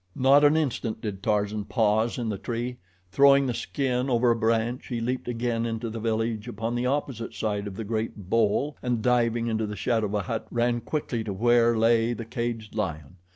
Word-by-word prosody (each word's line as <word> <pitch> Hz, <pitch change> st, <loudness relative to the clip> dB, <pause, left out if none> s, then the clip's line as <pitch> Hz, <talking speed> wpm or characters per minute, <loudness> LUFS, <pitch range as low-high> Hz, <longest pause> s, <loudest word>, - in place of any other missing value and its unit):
Not 135 Hz, +3 st, +5 dB
an 145 Hz, +2 st, +5 dB
instant 125 Hz, -8 st, -1 dB
did 100 Hz, -3 st, -5 dB
Tarzan 105 Hz, 0 st, 0 dB
pause 110 Hz, 0 st, +1 dB
in 120 Hz, -2 st, -2 dB
the 100 Hz, -3 st, -3 dB
tree. 120 Hz, +3 st, -4 dB, 0.3 s
Throwing 140 Hz, +3 st, +6 dB
the 125 Hz, -, -1 dB
skin 130 Hz, +1 st, -1 dB
over 120 Hz, -1 st, +3 dB
a -, -, +3 dB
branch 115 Hz, +2 st, 0 dB
he 120 Hz, -2 st, -3 dB
leaped 125 Hz, +2 st, -2 dB
again 120 Hz, -1 st, -1 dB
into 115 Hz, 0 st, -3 dB
the 115 Hz, -, -5 dB
village 110 Hz, 0 st, -1 dB
upon 115 Hz, 0 st, -3 dB
the 120 Hz, +1 st, 0 dB
opposite 130 Hz, -4 st, -2 dB
side 105 Hz, -2 st, -2 dB
of 100 Hz, -, -7 dB
the 110 Hz, -, -4 dB
great 110 Hz, -3 st, -4 dB
bole, 115 Hz, +7 st, +1 dB
and 120 Hz, -3 st, -1 dB
diving 120 Hz, -1 st, +2 dB
into 110 Hz, -2 st, -1 dB
the 105 Hz, -, -5 dB
shadow 110 Hz, +2 st, 0 dB
of 100 Hz, -, -3 dB
a 105 Hz, -, +1 dB
hut, 110 Hz, +4 st, -4 dB
ran 120 Hz, 0 st, 0 dB
quickly 125 Hz, -6 st, -3 dB
to 105 Hz, -3 st, -4 dB
where 120 Hz, +2 st, +3 dB
lay 115 Hz, +1 st, +3 dB
the 115 Hz, -1 st, -6 dB
caged 115 Hz, -2 st, -4 dB
lion. 90 Hz, -5 st, -4 dB
115 Hz, 200 wpm, -26 LUFS, 110-120 Hz, 0.3 s, Throwing